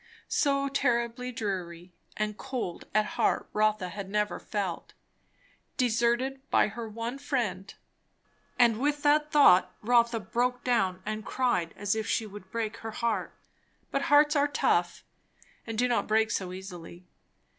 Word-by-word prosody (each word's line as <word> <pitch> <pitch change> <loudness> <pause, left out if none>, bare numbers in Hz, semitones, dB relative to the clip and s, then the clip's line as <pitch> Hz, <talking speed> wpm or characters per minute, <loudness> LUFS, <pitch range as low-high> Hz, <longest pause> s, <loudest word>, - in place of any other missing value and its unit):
So 275 -1 +1
terribly 245 -2 0
dreary 185 -6 -5 0.2
and 210 0 -1
cold 240 -8 -5
at 215 0 +2
heart - - 0
Rotha 215 -3 +1
had 195 +1 -7
never 210 +1 -1
felt. 195 -5 -4 0.8
Deserted 245 +2 +1
by - - +3
her 225 +1 -6
one 230 +5 -5
friend 210 -9 -2 0.9
and 235 -3 +4
with 290 +2 0
that 300 +1 +3
thought 185 - +6
Rotha 235 0 +3
broke 245 +4 -1
down 190 -7 +1
and 215 0 -3
cried 190 -9 0
as 205 0 0
if 220 0 -3
she 225 - 0
would 205 -2 -11
break 225 0 -3
her 225 - -6
heart. 230 0 -2 0.6
But 275 - 0
hearts 295 +1 +5
are 285 0 +3
tough, 290 - 0 0.6
and 225 -1 -4
do 250 +2 +3
not 240 -1 0
break 220 0 +2
so 185 -2 -2
easily. 180 -2 -9
225 Hz, 145 wpm, -28 LUFS, 200-250 Hz, 0.9 s, thought